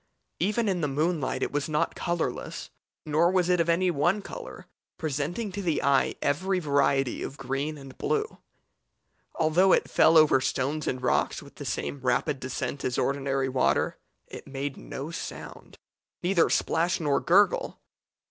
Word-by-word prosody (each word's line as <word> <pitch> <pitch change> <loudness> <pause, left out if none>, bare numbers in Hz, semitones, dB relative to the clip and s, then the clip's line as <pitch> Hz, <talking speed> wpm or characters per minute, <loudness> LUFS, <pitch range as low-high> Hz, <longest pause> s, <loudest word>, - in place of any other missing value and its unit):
Even 210 +5 +1
in 185 -3 0
the 150 - +1
moonlight 150 +1 -1
it - - -2
was 145 +1 -2
not 150 -1 0
colourless, 175 -2 -3 0.3
nor 155 +3 +3
was 185 -1 +2
it 180 -1 +3
of 170 0 +1
any 180 +2 +3
one 175 +7 +1
colour, - - -9 0.3
presenting 160 - -2
to 200 +2 -4
the 170 -5 0
eye 140 -1 +3
every 185 +7 +1
variety 140 -5 +1
of 140 - -6
green 140 +3 -3
and 135 -2 -11
blue. 440 0 -1 1.0
Although 170 +4 +4
it - - +2
fell 165 +1 +5
over 155 -4 +6
stones 135 +3 -1
and 125 0 -2
rocks - - +1
with - - -15
the - - -7
same 140 - -3
rapid 130 +2 0
descent 130 +1 -4
as 125 - -1
ordinary 135 -1 0
water, 130 -1 +1 0.3
it - - -10
made 135 0 -4
no 140 +4 -7
sound, - - -8 0.5
neither 175 -1 +3
splash 170 +3 +1
nor 145 -4 +1
gurgle. 200 +4 +2
155 Hz, 155 wpm, -27 LUFS, 135-175 Hz, 1.0 s, over